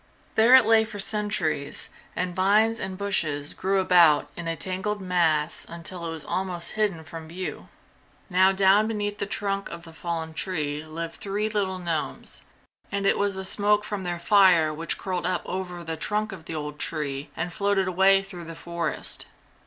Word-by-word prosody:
There 230 Hz, +4 st, +7 dB
it 260 Hz, -3 st, +7 dB
lay 225 Hz, 0 st, +5 dB
for 215 Hz, -2 st, -8 dB
centuries, 185 Hz, -9 st, 0 dB, 0.3 s
and 180 Hz, -1 st, -2 dB
vines 215 Hz, +4 st, +3 dB
and 190 Hz, -1 st, -4 dB
bushes 155 Hz, -8 st, -1 dB
grew 195 Hz, +1 st, 0 dB
about 175 Hz, -5 st, +5 dB
in 175 Hz, -1 st, -6 dB
a 165 Hz, -, -1 dB
tangled 190 Hz, +5 st, -2 dB
mass 170 Hz, -4 st, +1 dB
until 170 Hz, +1 st, -4 dB
it -, -, -3 dB
was 160 Hz, -2 st, -5 dB
almost 180 Hz, -3 st, -2 dB
hidden 205 Hz, -7 st, -1 dB
from 165 Hz, 0 st, -9 dB
view. 180 Hz, +3 st, -6 dB, 0.6 s
Now 185 Hz, 0 st, +4 dB
down 195 Hz, +2 st, +4 dB
beneath 205 Hz, -2 st, -3 dB
the 200 Hz, -, -2 dB
trunk 200 Hz, -1 st, -2 dB
of 170 Hz, 0 st, -8 dB
the 165 Hz, -1 st, -12 dB
fallen 160 Hz, 0 st, -4 dB
tree 150 Hz, -4 st, -2 dB
lived 165 Hz, +1 st, -6 dB
three 205 Hz, +2 st, -2 dB
little 200 Hz, -3 st, -1 dB
gnomes, 170 Hz, -3 st, -3 dB, 0.5 s
and 200 Hz, -1 st, -1 dB
it -, -, +3 dB
was 200 Hz, -1 st, +1 dB
the 190 Hz, 0 st, -4 dB
smoke 205 Hz, +2 st, +3 dB
from 205 Hz, -2 st, -4 dB
their 175 Hz, -1 st, -2 dB
fire 175 Hz, -4 st, +5 dB
which 165 Hz, +2 st, -3 dB
curled 180 Hz, -2 st, -2 dB
up 185 Hz, -1 st, -1 dB
over 180 Hz, -2 st, -4 dB
the 165 Hz, -1 st, -4 dB
trunk 210 Hz, +5 st, -1 dB
of 175 Hz, -4 st, -9 dB
the 165 Hz, -, -5 dB
old 150 Hz, -1 st, -5 dB
tree 145 Hz, -2 st, -2 dB
and 175 Hz, +1 st, -3 dB
floated 200 Hz, +1 st, +1 dB
away 190 Hz, +2 st, +4 dB
through 180 Hz, -3 st, -8 dB
the 165 Hz, 0 st, -8 dB
forest. 170 Hz, -1 st, -4 dB
185 Hz, 180 wpm, -26 LUFS, 165-200 Hz, 0.6 s, There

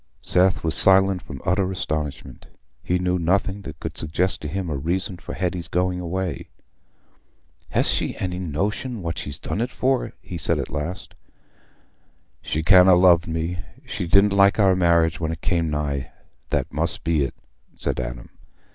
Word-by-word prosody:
Seth 90 Hz, +1 st, +2 dB
was 80 Hz, -1 st, +2 dB
silent 95 Hz, -1 st, +5 dB
from 70 Hz, -3 st, -9 dB
utter 95 Hz, +1 st, +1 dB
astonishment: 75 Hz, -6 st, -4 dB, 0.3 s
he 90 Hz, -, 0 dB
knew 90 Hz, 0 st, 0 dB
nothing 95 Hz, +3 st, 0 dB
that 80 Hz, -4 st, -9 dB
could 80 Hz, 0 st, -5 dB
suggest 85 Hz, +4 st, -1 dB
to 75 Hz, -, -4 dB
him 95 Hz, +4 st, -3 dB
a 75 Hz, -, -2 dB
reason 90 Hz, +7 st, -2 dB
for -, -, -8 dB
Hetty's 90 Hz, -2 st, -2 dB
going 90 Hz, +1 st, 0 dB
away. 90 Hz, 0 st, -3 dB, 1.2 s
"Hast -, -, +1 dB, 0.2 s
any 90 Hz, -1 st, -3 dB
notion 100 Hz, -, -3 dB
what 85 Hz, -2 st, -3 dB
she's 75 Hz, -2 st, -6 dB
done 105 Hz, -, -3 dB
it 120 Hz, -, -1 dB
for?" 130 Hz, +1 st, 0 dB
he 85 Hz, -, -7 dB
said, -, -, 0 dB
at -, -, -4 dB
last. 85 Hz, +6 st, -5 dB, 1.3 s
"She 80 Hz, -, -2 dB
can't 90 Hz, +2 st, +7 dB
ha' 90 Hz, -, +7 dB
loved 90 Hz, -2 st, +5 dB
me. 80 Hz, +2 st, -3 dB, 0.3 s
She 90 Hz, -, -4 dB
didn't 100 Hz, +3 st, +5 dB
like 100 Hz, 0 st, +5 dB
our 95 Hz, -3 st, +4 dB
marriage 85 Hz, -3 st, +3 dB
when 80 Hz, -1 st, -1 dB
it 80 Hz, 0 st, -6 dB
came 85 Hz, -3 st, 0 dB
nigh—that 70 Hz, -3 st, -4 dB
must -, -, -1 dB
be 80 Hz, -1 st, +1 dB
it," 70 Hz, -, -2 dB, 0.4 s
said -, -, -1 dB
Adam. 60 Hz, -1 st, -6 dB
90 Hz, 165 wpm, -23 LUFS, 80-95 Hz, 1.3 s, can't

